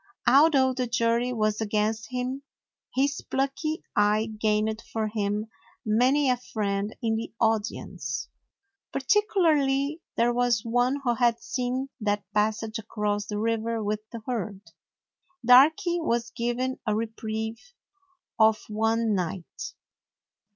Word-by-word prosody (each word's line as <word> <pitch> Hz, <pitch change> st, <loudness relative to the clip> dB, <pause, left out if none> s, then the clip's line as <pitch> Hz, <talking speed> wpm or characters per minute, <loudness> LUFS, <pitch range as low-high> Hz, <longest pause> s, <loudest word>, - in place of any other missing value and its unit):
Although 275 Hz, -1 st, +5 dB
the 250 Hz, -1 st, -2 dB
jury 235 Hz, +1 st, +1 dB
was 215 Hz, -2 st, 0 dB
against 215 Hz, +1 st, 0 dB
him, 255 Hz, +2 st, -3 dB, 0.5 s
his 280 Hz, +2 st, +1 dB
plucky 275 Hz, +4 st, -2 dB
eye 210 Hz, +2 st, +2 dB
gained 215 Hz, 0 st, +1 dB
for 220 Hz, -1 st, -1 dB
him 210 Hz, 0 st, -1 dB, 0.4 s
many 255 Hz, +7 st, +3 dB
a 250 Hz, -1 st, +3 dB
friend 205 Hz, -3 st, -3 dB
in 225 Hz, -1 st, +1 dB
the 225 Hz, -, -5 dB
audience. 205 Hz, -, -1 dB, 0.6 s
Particularly 300 Hz, -4 st, +2 dB, 0.2 s
there 240 Hz, +1 st, +3 dB
was 240 Hz, -3 st, +1 dB
one 245 Hz, +4 st, +1 dB
who 240 Hz, -2 st, +2 dB
had 235 Hz, -1 st, +2 dB
seen 255 Hz, +1 st, -2 dB
that 205 Hz, -2 st, 0 dB
passage 220 Hz, +1 st, 0 dB
across 210 Hz, -1 st, -2 dB
the 210 Hz, -, -3 dB
river 225 Hz, +1 st, -1 dB
with 210 Hz, +1 st, -1 dB
the 230 Hz, -, -7 dB
herd. 210 Hz, -5 st, -3 dB, 0.8 s
Darky 320 Hz, -, +6 dB
was 235 Hz, -6 st, -1 dB
given 240 Hz, +2 st, -2 dB
a 210 Hz, -, +2 dB
re 225 Hz, +2 st, 0 dB
prieve 220 Hz, 0 st, -5 dB, 0.8 s
of 220 Hz, 0 st, +5 dB
one 225 Hz, +1 st, +1 dB
night. 180 Hz, -2 st, -4 dB
230 Hz, 125 wpm, -27 LUFS, 215-255 Hz, 0.8 s, Darky